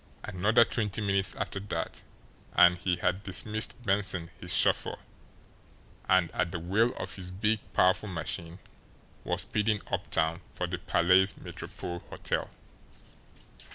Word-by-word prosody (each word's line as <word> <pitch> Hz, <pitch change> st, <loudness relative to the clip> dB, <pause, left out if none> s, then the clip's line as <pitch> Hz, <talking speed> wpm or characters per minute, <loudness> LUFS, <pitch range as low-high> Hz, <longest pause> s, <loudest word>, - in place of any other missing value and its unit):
Another 105 Hz, +4 st, +3 dB
twenty 105 Hz, -3 st, -2 dB
minutes 100 Hz, -2 st, +1 dB
after 100 Hz, -, -3 dB
that, 100 Hz, -1 st, -4 dB, 0.5 s
and 90 Hz, 0 st, +6 dB
he 90 Hz, 0 st, +1 dB
had 90 Hz, +2 st, 0 dB
dismissed 105 Hz, +2 st, 0 dB
Benson, 95 Hz, -5 st, +1 dB
his -, -, -3 dB
chauffeur, -, -, +2 dB, 1.1 s
and, 95 Hz, -2 st, +4 dB
at 90 Hz, -2 st, -1 dB
the 85 Hz, -, -3 dB
wheel 100 Hz, +8 st, +2 dB
of -, -, -5 dB
his 90 Hz, -1 st, -5 dB
big, 105 Hz, +4 st, 0 dB
powerful 95 Hz, +3 st, +3 dB
machine, 85 Hz, 0 st, -4 dB, 0.7 s
was -, -, 0 dB
speeding 105 Hz, 0 st, 0 dB
uptown 80 Hz, +2 st, 0 dB
for 90 Hz, -, -1 dB
the 90 Hz, 0 st, -4 dB
Palais 90 Hz, 0 st, +4 dB
Metropole 85 Hz, 0 st, -7 dB
Hotel. -, -, -2 dB
95 Hz, 125 wpm, -29 LUFS, 90-105 Hz, 1.1 s, and